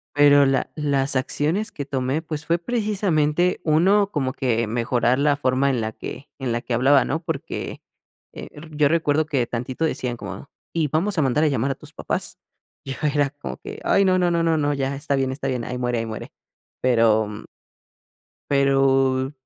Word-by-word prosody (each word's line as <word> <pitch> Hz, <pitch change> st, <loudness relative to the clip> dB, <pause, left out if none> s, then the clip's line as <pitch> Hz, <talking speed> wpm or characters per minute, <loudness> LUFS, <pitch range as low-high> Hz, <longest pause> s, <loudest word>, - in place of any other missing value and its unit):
pero 145 Hz, -1 st, +6 dB
la 135 Hz, 0 st, 0 dB
las 140 Hz, -2 st, 0 dB
acciones 155 Hz, -, -1 dB
que 145 Hz, -, -5 dB
tomé, 135 Hz, +2 st, -2 dB
pues, 155 Hz, -2 st, -6 dB
fue 170 Hz, +2 st, +2 dB
precisamente 180 Hz, -6 st, 0 dB
1 195 Hz, +6 st, +3 dB
como 135 Hz, -6 st, -1 dB
que 120 Hz, -4 st, 0 dB
mejorar 120 Hz, +2 st, +1 dB
la 145 Hz, 0 st, +3 dB
forma 130 Hz, 0 st, +1 dB
en 125 Hz, -3 st, 0 dB
la 110 Hz, 0 st, -3 dB
que 140 Hz, +6 st, -8 dB
en 130 Hz, -3 st, -2 dB
la 120 Hz, -, -1 dB
que 120 Hz, -, -3 dB
hablaba, 135 Hz, +3 st, +4 dB
¿no? 160 Hz, +4 st, -2 dB
Porque, 165 Hz, -5 st, -5 dB, 0.5 s
eh, -, -, -8 dB
r 150 Hz, +2 st, -11 dB
yo 150 Hz, -1 st, +3 dB
recuerdo 155 Hz, -1 st, +1 dB
que 135 Hz, -6 st, 0 dB
tantito 125 Hz, +6 st, -3 dB
decían 125 Hz, -6 st, -2 dB
como: 100 Hz, +3 st, -8 dB, 0.2 s
"Y 160 Hz, -3 st, 0 dB
vamos 175 Hz, +6 st, 0 dB
a -, -, +4 dB
mandar 140 Hz, +3 st, +2 dB
a 155 Hz, -, +4 dB
llamar 135 Hz, -1 st, 0 dB
a -, -, -4 dB
tus -, -, -14 dB
papás". -, -, -4 dB, 0.5 s
Yo 135 Hz, -, -4 dB, 0.2 s
era 145 Hz, -2 st, +2 dB
como 145 Hz, -, -7 dB
que: -, -, -9 dB
"Ay, 200 Hz, -, +4 dB
no, 185 Hz, -1 st, +3 dB
no, 180 Hz, -1 st, +2 dB
no, 170 Hz, -1 st, +1 dB
no, 155 Hz, -3 st, +1 dB
ya 135 Hz, 0 st, -2 dB
está 140 Hz, 0 st, -1 dB
bien, 135 Hz, -1 st, 0 dB
está 135 Hz, -, -4 dB
bien, 125 Hz, -2 st, -2 dB
ahí 125 Hz, +1 st, -4 dB
muere, 120 Hz, -1 st, -1 dB
ahí 115 Hz, -, -2 dB
muere". 110 Hz, -1 st, -7 dB, 0.5 s
Pero, 115 Hz, -3 st, +3 dB
m 105 Hz, 0 st, -8 dB, 1.1 s
pero, 135 Hz, -1 st, +2 dB
140 Hz, 190 wpm, -23 LUFS, 130-155 Hz, 1.1 s, pero